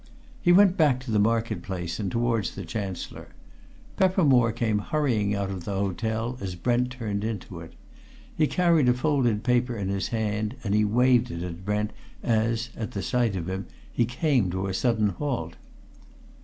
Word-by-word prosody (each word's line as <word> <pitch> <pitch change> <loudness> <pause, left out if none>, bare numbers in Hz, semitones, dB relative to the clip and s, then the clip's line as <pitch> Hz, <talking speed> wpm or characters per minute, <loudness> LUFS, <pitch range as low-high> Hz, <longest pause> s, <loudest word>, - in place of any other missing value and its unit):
He 175 - +4
went 190 +1 +6
back 145 -6 +4
to 130 -3 -6
the 105 - +3
market 110 -2 +1
place 90 -1 -4
and 100 -3 -2
towards 115 -2 0
the 100 - -6
Chancellor. 100 -4 -5 0.7
Peppermore 145 -11 +4
came 110 -2 0
hurrying 110 -6 0
out 100 -1 -2
of 95 -3 -5
the 100 +2 -3
hotel 110 +5 -2
as 95 -2 -4
Brent 120 +7 +1
turned 105 -5 -3
into 100 -5 -5
it. 85 0 -11 0.6
He 155 - +3
carried 170 -7 +3
a 125 - +4
folded 125 -5 +1
paper 125 -1 +1
in 95 -2 -2
his 100 -1 -1
hand, 110 0 -2
and 100 -3 -1
he 105 0 +4
waved 120 +3 +3
it 85 0 -5
at 90 0 -6
Brent 105 +2 -1 0.3
as, 115 +1 0
at 110 - -5
sight 115 +1 0
of 85 -2 -3
him, 95 +1 -4 0.3
he 120 - +2
came 120 - +1
to 95 +2 -2
a 95 - -2
sudden 110 0 +2
halt. 100 - -3
110 Hz, 175 wpm, -26 LUFS, 100-125 Hz, 0.7 s, went